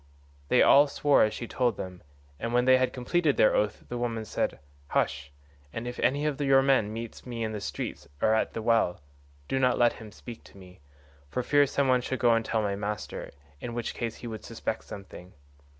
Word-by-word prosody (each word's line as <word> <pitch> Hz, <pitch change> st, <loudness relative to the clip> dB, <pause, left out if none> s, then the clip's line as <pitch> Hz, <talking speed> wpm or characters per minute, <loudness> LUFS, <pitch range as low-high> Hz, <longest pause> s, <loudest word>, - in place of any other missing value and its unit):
"They -, -, +5 dB
all 145 Hz, +1 st, +7 dB
swore 145 Hz, 0 st, +3 dB
as 110 Hz, -, +2 dB
she 120 Hz, -, -6 dB
told 120 Hz, -4 st, 0 dB
them, 90 Hz, -1 st, -7 dB, 0.4 s
and 115 Hz, +1 st, -2 dB
when 125 Hz, 0 st, +3 dB
they 130 Hz, 0 st, +6 dB
had 130 Hz, 0 st, +1 dB
completed 145 Hz, +4 st, 0 dB
their 110 Hz, -, +5 dB
oath 105 Hz, 0 st, 0 dB
the 120 Hz, -, -4 dB
woman 115 Hz, -2 st, -2 dB
said, -, -, -2 dB, 0.3 s
'Hush; 70 Hz, 0 st, -1 dB, 0.4 s
and 115 Hz, +8 st, -5 dB
if 120 Hz, -, -6 dB
any 140 Hz, +4 st, +1 dB
of 150 Hz, -1 st, -1 dB
your 135 Hz, -1 st, +5 dB
men 130 Hz, -6 st, +3 dB
meets 115 Hz, +1 st, -7 dB
me 120 Hz, -2 st, -5 dB
in 110 Hz, -, -2 dB
the 105 Hz, -2 st, -5 dB
street -, -, -5 dB
or 110 Hz, -, +3 dB
at 110 Hz, -, 0 dB
the 115 Hz, -, -4 dB
well, 115 Hz, -6 st, +2 dB, 0.5 s
do 135 Hz, -, 0 dB
not 125 Hz, -1 st, +3 dB
let 120 Hz, -1 st, +4 dB
him 110 Hz, -1 st, -10 dB
speak 115 Hz, +3 st, -10 dB
to -, -, -16 dB
me, 90 Hz, -1 st, -14 dB, 0.5 s
for 125 Hz, -, -2 dB
fear 145 Hz, +2 st, +4 dB
some 140 Hz, 0 st, 0 dB
one 125 Hz, -1 st, +3 dB
should 130 Hz, +1 st, -3 dB
go 120 Hz, -1 st, +4 dB
and 115 Hz, 0 st, +2 dB
tell 110 Hz, -1 st, 0 dB
my 100 Hz, -1 st, -1 dB
master, 105 Hz, +1 st, -5 dB, 0.3 s
in 120 Hz, -1 st, -6 dB
which 120 Hz, -1 st, -3 dB
case 115 Hz, -2 st, -4 dB
he 120 Hz, -, -9 dB
would 110 Hz, -2 st, -7 dB
suspect -, -, -4 dB
something. 95 Hz, -1 st, -10 dB
120 Hz, 215 wpm, -28 LUFS, 105-130 Hz, 0.5 s, all